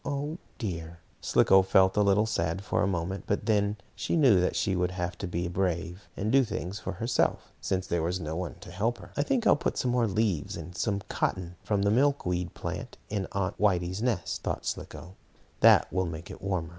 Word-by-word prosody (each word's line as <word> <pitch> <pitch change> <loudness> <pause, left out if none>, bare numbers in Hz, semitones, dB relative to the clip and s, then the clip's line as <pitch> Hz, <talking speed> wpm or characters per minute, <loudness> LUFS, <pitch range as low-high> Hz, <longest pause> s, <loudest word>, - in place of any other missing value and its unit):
Oh 145 +4 -3 0.2
dear!" 85 -5 -5 0.2
Slicko 95 0 +5
felt 95 0 +4
a 105 - +4
little 100 +1 +4
sad 95 -4 -1
for - - 0
a - - +2
moment, 95 +1 -2
but 100 - -1
then 105 -1 +2 0.2
she - - -2
knew 130 - +6
that 90 - 0
she 95 -3 +1
would 90 0 +1
have 90 -1 -3
to 100 - -3
be 85 0 -2
brave, 90 0 -2
and 105 +2 -1
do 135 +1 +6
things 105 -4 -4
for 100 - -4
herself, 115 +5 0
since 95 -1 -1
there 85 -1 -1
was 90 +3 -1
no 80 -2 -4
one 90 0 -4
to 90 - -10
help 110 +6 -1
her. - - -13
"I - - +1
think 235 - 0
I'll - - +6
put - - -2
some 125 - +1
more 120 -2 +2
leaves, 100 -6 0
and 90 - -8
some 100 0 -1
cotton 90 -1 -2
from 100 -2 0
the 100 - +3
milkweed 105 - +1
plant, - - -5
in 100 -2 -2
Aunt 95 -1 -2
Whitey's 95 -1 +1
nest," 115 -9 -1
thought - - -3
Slicko. 90 +2 -5 0.5
"That - - +6
will 95 -1 +1
make 85 +2 -7
it - - -10
warmer." 90 -4 -2
95 Hz, 210 wpm, -28 LUFS, 90-110 Hz, 0.5 s, knew